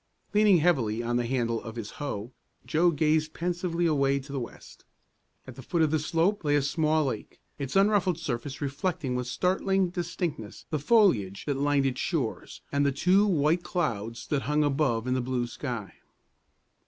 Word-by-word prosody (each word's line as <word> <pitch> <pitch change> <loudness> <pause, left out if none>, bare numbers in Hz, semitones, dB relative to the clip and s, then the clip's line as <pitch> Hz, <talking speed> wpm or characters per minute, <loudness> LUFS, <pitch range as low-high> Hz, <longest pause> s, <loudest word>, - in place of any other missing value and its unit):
Leaning 210 -3 +5
heavily 125 -10 +1
on 120 +1 -1
the 120 -1 -1
handle 115 -3 0
of 110 -1 -8
his 110 -3 -6
hoe, 120 -5 -4 0.3
Joe 170 +3 +3
gazed 155 0 +1
pensively 175 0 -1
away 140 -4 +2
to 140 +1 -12
the 140 - -2
west. 120 - -10 0.6
At 130 - -9
the 130 - -9
foot 165 +6 0
of 155 - +2
the 155 - +2
slope 170 +6 0
lay 145 -1 +2
a 145 - +2
small 155 +1 +1
lake, 120 -6 -5 0.2
its 135 -2 -4
unruffled 195 -3 +3
surface 140 -4 -4
reflecting 145 0 -2
with 125 0 -2
startling 190 +5 +1
distinctness 170 - -4
the 155 - 0
foliage 140 - +3
that 145 - 0
lined 145 0 +2
its 130 -1 -1
shores, - - -3
and 140 0 +2
the 140 - +3
two 185 +9 +3
white 165 -1 +2
clouds 115 - -3
that 145 -2 +1
hung 150 +3 +1
above 135 -5 +1
in 130 - 0
the 130 - 0
blue 125 0 -1
sky. 120 -4 -5
145 Hz, 180 wpm, -28 LUFS, 125-170 Hz, 0.6 s, Leaning